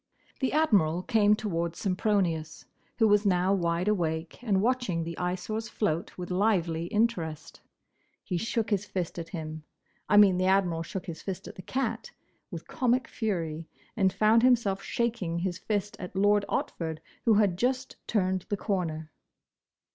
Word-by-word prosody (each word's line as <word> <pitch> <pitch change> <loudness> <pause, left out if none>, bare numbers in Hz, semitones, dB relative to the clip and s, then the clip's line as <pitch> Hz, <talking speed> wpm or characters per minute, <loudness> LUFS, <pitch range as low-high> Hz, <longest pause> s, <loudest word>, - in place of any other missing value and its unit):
The 265 - 0
Admiral 195 - +3
came 210 -2 +4
towards 170 -6 -2
Sempronius, 180 -5 -1 0.3
who 225 - +4
was 205 0 +4
now 185 -1 +2
wide 170 -1 0
awake 165 -2 -1
and 205 -5 +2
watching 225 -7 0
the 170 +1 -5
Eyesore's 185 +5 -3
float 170 -6 -2
with 180 0 -6
lively 180 -4 +1
interest; 170 -8 -1 0.6
he 180 - -3
shook 225 +3 -1
his 200 -1 +2
fist 185 -4 -4
at 165 0 -6
him—I 155 +4 -4
mean 200 -3 +7
the 185 - +2
Admiral 185 -4 +2
shook 180 +2 -5
his 170 -4 -7
fist 190 -1 -5
at - - -8
the - - -10
cat—with 265 - -5
comic 250 -1 +1
fury, 165 -8 -3 0.3
and 190 -3 +3
found 220 +3 +4
himself 235 -6 +3
shaking 225 -8 -1
his 175 0 -2
fist 205 0 -2
at 180 0 -7
Lord 205 +1 +3
Otford, 160 -2 -2 0.3
who 225 -3 +5
had 200 -4 +3
just 255 +6 -1
turned 185 -4 0
the 205 - 0
corner. 160 -6 -2
190 Hz, 150 wpm, -28 LUFS, 170-215 Hz, 0.6 s, mean